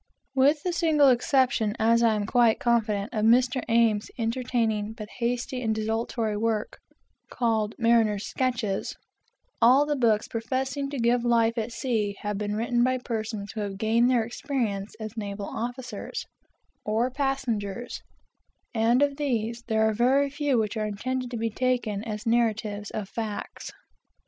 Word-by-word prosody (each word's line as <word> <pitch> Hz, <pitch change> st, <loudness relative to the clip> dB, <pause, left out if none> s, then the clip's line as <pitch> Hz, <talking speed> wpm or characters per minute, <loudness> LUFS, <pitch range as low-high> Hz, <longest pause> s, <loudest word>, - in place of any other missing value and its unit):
With 285 Hz, +3 st, +3 dB
the 360 Hz, -, -1 dB
single 315 Hz, -5 st, +4 dB
exception, 245 Hz, -4 st, +2 dB
as 230 Hz, +1 st, +3 dB
I 230 Hz, -2 st, +4 dB
am 205 Hz, -1 st, -1 dB
quite 235 Hz, 0 st, +3 dB
confident, 220 Hz, -3 st, 0 dB
of 215 Hz, -2 st, -1 dB
Mr. 250 Hz, +3 st, +3 dB
Ames's 230 Hz, -2 st, +3 dB
entertaining, 230 Hz, -3 st, -1 dB
but 215 Hz, -1 st, -8 dB
hasty 245 Hz, +2 st, -2 dB
and 220 Hz, -2 st, 0 dB
desultory 220 Hz, 0 st, -1 dB
work, 215 Hz, 0 st, -1 dB, 0.5 s
called 220 Hz, -3 st, 0 dB
"Mariner's 225 Hz, -3 st, +2 dB
Sketches," 230 Hz, -7 st, -2 dB, 0.7 s
all 255 Hz, +5 st, +6 dB
the 295 Hz, 0 st, 0 dB
books 225 Hz, -5 st, +2 dB
professing 265 Hz, +4 st, -2 dB
to 285 Hz, -, -5 dB
give 240 Hz, 0 st, +2 dB
life 230 Hz, -1 st, +3 dB
at 230 Hz, 0 st, -3 dB
sea 220 Hz, -6 st, -1 dB
have 205 Hz, -1 st, -3 dB
been 210 Hz, 0 st, -2 dB
written 240 Hz, +2 st, +1 dB
by 255 Hz, +1 st, +2 dB
persons 220 Hz, -4 st, -4 dB
who 220 Hz, -, -5 dB
have 200 Hz, -2 st, -4 dB
gained 225 Hz, +4 st, +3 dB
their 245 Hz, -3 st, +3 dB
experience 225 Hz, -4 st, -3 dB
as 220 Hz, 0 st, -6 dB
naval 200 Hz, -2 st, -4 dB
officers, 245 Hz, 0 st, -5 dB, 0.6 s
or 225 Hz, +4 st, 0 dB
passengers, 245 Hz, -5 st, -2 dB, 0.7 s
and 235 Hz, +4 st, +3 dB
of 280 Hz, -1 st, 0 dB
these, 235 Hz, -5 st, -1 dB
there 220 Hz, -1 st, +2 dB
are 220 Hz, -, +1 dB
very 265 Hz, +5 st, +2 dB
few 285 Hz, -2 st, 0 dB
which 220 Hz, 0 st, 0 dB
are 215 Hz, 0 st, -1 dB
intended 255 Hz, +5 st, -3 dB
to 240 Hz, -, -4 dB
be 225 Hz, 0 st, -1 dB
taken 240 Hz, -4 st, -1 dB
as 215 Hz, 0 st, -5 dB
narratives 220 Hz, -3 st, 0 dB
of 210 Hz, -3 st, -5 dB
facts. 215 Hz, 0 st, -5 dB
230 Hz, 155 wpm, -26 LUFS, 215-250 Hz, 0.7 s, all